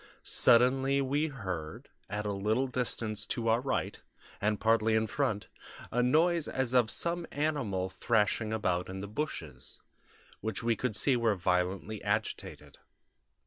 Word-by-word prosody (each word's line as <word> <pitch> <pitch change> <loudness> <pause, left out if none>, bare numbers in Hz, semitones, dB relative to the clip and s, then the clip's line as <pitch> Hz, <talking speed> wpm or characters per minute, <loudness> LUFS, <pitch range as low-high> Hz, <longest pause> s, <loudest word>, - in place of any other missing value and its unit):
Suddenly, 130 +3 +4
we 140 +3 +1
heard, 95 - -6 0.2
at 105 +1 -3
a 105 - -1
little 110 +6 +1
distance 115 -4 -2
to 115 -2 -2
our 115 +2 +3
right, 135 - -2 0.4
and 105 0 +1
partly 110 0 +3
in 110 0 +2
front, 110 -2 -1 0.5
a 125 - +2
noise 160 +6 +3
as 130 -2 -2
of 120 -3 +4
some 170 +4 -1
animal 135 -11 -1
thrashing 105 +3 0
about 90 -5 -1
in 95 - -5
the 100 - -5
bushes, 100 - -5 0.6
which 110 +2 -4
we 115 0 +2
could 120 -1 -2
see 130 +4 +3
were 115 -3 +2
violently 95 +3 -1
agitated. 105 +2 -3
110 Hz, 145 wpm, -31 LUFS, 100-130 Hz, 0.6 s, Suddenly